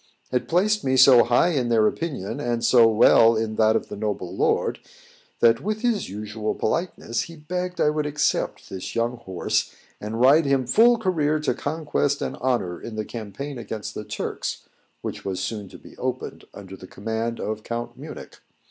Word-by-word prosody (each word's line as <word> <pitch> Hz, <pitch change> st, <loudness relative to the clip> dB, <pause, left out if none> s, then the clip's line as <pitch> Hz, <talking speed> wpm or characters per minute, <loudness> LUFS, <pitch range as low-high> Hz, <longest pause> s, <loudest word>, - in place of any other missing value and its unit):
It 125 Hz, -1 st, -1 dB
placed 210 Hz, +5 st, +2 dB
me 130 Hz, 0 st, +1 dB
so 130 Hz, -2 st, +8 dB
high 120 Hz, +9 st, +3 dB
in 130 Hz, -8 st, 0 dB
their 115 Hz, -2 st, +4 dB
opinion, 140 Hz, -, -2 dB
and 120 Hz, -4 st, -1 dB
so 120 Hz, -3 st, +6 dB
well 115 Hz, +1 st, +6 dB
in 110 Hz, 0 st, -2 dB
that 110 Hz, 0 st, +4 dB
of -, -, -1 dB
the -, -, -7 dB
noble 105 Hz, -4 st, -3 dB
lord, -, -, +1 dB, 0.6 s
that, 115 Hz, -1 st, +5 dB
with 215 Hz, +2 st, -2 dB
his 235 Hz, -5 st, 0 dB
usual 105 Hz, +2 st, -4 dB
politeness, 140 Hz, -4 st, -2 dB
he 165 Hz, -, -11 dB
begged 180 Hz, +3 st, -4 dB
I 150 Hz, -, +3 dB
would 150 Hz, -1 st, -1 dB
accept 150 Hz, 0 st, -1 dB
of -, -, -17 dB
this 95 Hz, -1 st, -6 dB
young 120 Hz, +1 st, 0 dB
horse, 95 Hz, -6 st, -2 dB, 0.3 s
and 110 Hz, +2 st, -5 dB
ride 140 Hz, +6 st, +6 dB
him 135 Hz, -2 st, +2 dB
full 235 Hz, -, +5 dB
career 155 Hz, -8 st, +1 dB
to 150 Hz, -, +1 dB
conquest 145 Hz, 0 st, -1 dB
and -, -, -3 dB
honour 120 Hz, -9 st, -1 dB
in 115 Hz, -, -7 dB
the 110 Hz, 0 st, -3 dB
campaign 120 Hz, +5 st, -6 dB
against 110 Hz, -2 st, -6 dB
the 105 Hz, -, -6 dB
Turks, 105 Hz, -, -5 dB, 0.4 s
which -, -, -5 dB
was 95 Hz, -2 st, -3 dB
soon 100 Hz, 0 st, -4 dB
to -, -, -12 dB
be -, -, -15 dB
opened, -, -, -4 dB
under 95 Hz, -1 st, -10 dB
the 95 Hz, -, -12 dB
command 115 Hz, +4 st, -3 dB
of 110 Hz, 0 st, -3 dB
Count 120 Hz, +1 st, -5 dB
Munich. -, -, -10 dB
120 Hz, 185 wpm, -24 LUFS, 110-150 Hz, 0.6 s, so